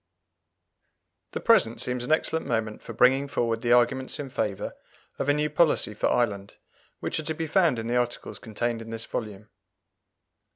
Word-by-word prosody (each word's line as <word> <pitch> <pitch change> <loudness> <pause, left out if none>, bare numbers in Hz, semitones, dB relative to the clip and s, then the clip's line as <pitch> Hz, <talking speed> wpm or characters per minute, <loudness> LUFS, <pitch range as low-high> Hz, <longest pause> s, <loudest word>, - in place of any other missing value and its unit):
The - - -2
present 115 - +3
seems 125 -1 -1
an 125 - -3
excellent 160 0 +1
moment 110 -3 -2
for - - -8
bringing 135 +3 +4
forward 115 -4 -1
the 120 -1 0
arguments 130 +3 +2
in 140 -3 -5
favour 105 -6 -2 0.4
of 145 - -1
a - - +5
new 150 0 +1
policy 150 -7 +2
for 105 - 0
Ireland, 100 -5 0 0.5
which - - -1
are - - -4
to 160 +1 -1
be 160 - -3
found 160 -4 +3
in 115 - -4
the 120 +2 0
articles 120 0 -2
contained 115 +1 -3
in 115 - -9
this 115 0 -4
volume. 105 -2 -6
120 Hz, 175 wpm, -26 LUFS, 115-145 Hz, 0.5 s, a